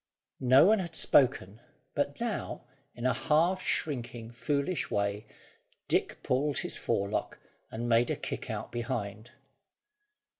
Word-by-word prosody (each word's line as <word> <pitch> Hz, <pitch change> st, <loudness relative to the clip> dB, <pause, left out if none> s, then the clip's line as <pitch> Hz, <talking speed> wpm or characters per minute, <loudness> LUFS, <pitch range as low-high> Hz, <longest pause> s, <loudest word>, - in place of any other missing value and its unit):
No 130 Hz, +3 st, +6 dB
one 215 Hz, +2 st, +5 dB
had 170 Hz, -3 st, -5 dB
spoken; 115 Hz, -8 st, +3 dB, 0.3 s
but 145 Hz, 0 st, -1 dB
now, 235 Hz, -2 st, -3 dB, 0.3 s
in 120 Hz, -, -5 dB
a 130 Hz, -, +4 dB
half 170 Hz, +5 st, +2 dB
shrinking 120 Hz, -5 st, -2 dB
foolish 140 Hz, +7 st, -1 dB
way, 100 Hz, +1 st, -1 dB, 0.6 s
Dick -, -, 0 dB
pulled 140 Hz, +3 st, +1 dB
his -, -, -2 dB
forelock, 100 Hz, 0 st, -1 dB, 0.3 s
and 120 Hz, +2 st, -4 dB
made 120 Hz, +1 st, +3 dB
a -, -, +1 dB
kick -, -, -5 dB
out -, -, -4 dB
behind. 115 Hz, -2 st, -4 dB
125 Hz, 125 wpm, -30 LUFS, 115-150 Hz, 0.6 s, No